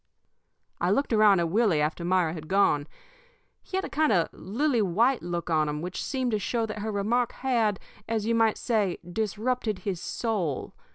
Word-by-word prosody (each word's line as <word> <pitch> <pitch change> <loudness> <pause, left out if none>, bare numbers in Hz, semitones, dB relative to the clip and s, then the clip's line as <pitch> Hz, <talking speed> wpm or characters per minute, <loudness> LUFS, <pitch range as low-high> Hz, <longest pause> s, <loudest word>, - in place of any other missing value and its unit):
"I - - +1
looked 275 -3 +1
around 210 -4 +5
at 170 - 0
Willie 205 -6 +3
after 155 +3 -1
Myra 175 -2 +2
had 155 -2 -8
gone. 160 -6 +2 0.7
He 375 - -4
had 380 - -1
a - - -6
kind 310 -1 +2
of 175 -5 +1
a - - -19
lily 245 +4 0
white 225 +7 +2
look 175 0 -4
on 155 -1 +2
him 150 0 -3
which 180 +1 -4
seemed 260 -3 -1
to 215 - +1
show 230 +3 -1
that 215 -1 -6
her 215 +1 -3
remark 225 +4 0
had, 230 -6 0 0.3
as 220 -2 -1
you 230 - +1
might 225 -1 +3
say, 210 -7 0
disrupted 220 +3 -2
his 185 -4 -2
soul. 190 - -2
210 Hz, 190 wpm, -27 LUFS, 175-230 Hz, 0.7 s, around